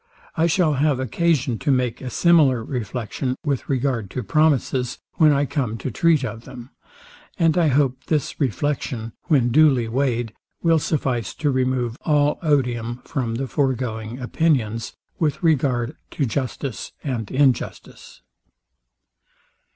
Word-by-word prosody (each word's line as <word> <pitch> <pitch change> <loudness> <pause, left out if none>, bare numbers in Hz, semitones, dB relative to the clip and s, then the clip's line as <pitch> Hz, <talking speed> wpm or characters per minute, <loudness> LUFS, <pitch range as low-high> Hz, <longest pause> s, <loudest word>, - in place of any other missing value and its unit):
I 165 +1 +2
shall 170 -2 +2
have 140 -1 +1
occasion 130 -1 0
to 145 - -2
make 125 -3 +1
a 130 - -5
similar 145 -6 +4
reflection 125 +1 -3
with 140 -4 -2
regard 130 -6 -1
to 125 - -4
promises, 135 -3 +1 0.2
when 155 -2 +6
I 140 0 +2
come 125 -6 -2
to 130 - -4
treat 155 +3 +2
of 115 0 -6
them; 125 -1 -11 0.7
and 165 -4 +3
I 175 -3 +3
hope 130 -2 +1
this 150 -4 -1
reflection, 130 -3 -2
when 135 -8 +3
duly 135 -4 +4
weighed, 120 -2 -1 0.3
will 165 -1 +4
suffice 130 -8 -1
to 145 -2 0
remove 130 -2 0
all 150 -1 +2
odium 125 -6 0
from 120 -6 -2
the 135 +3 -2
foregoing 125 -4 -2
opinions, 125 -5 0 0.3
with 160 +3 0
regard 135 -4 +1 0.2
to 140 - +2
justice 125 -1 -4
and 120 -7 -3
injustice. 135 -2 -1
130 Hz, 135 wpm, -22 LUFS, 120-150 Hz, 0.7 s, when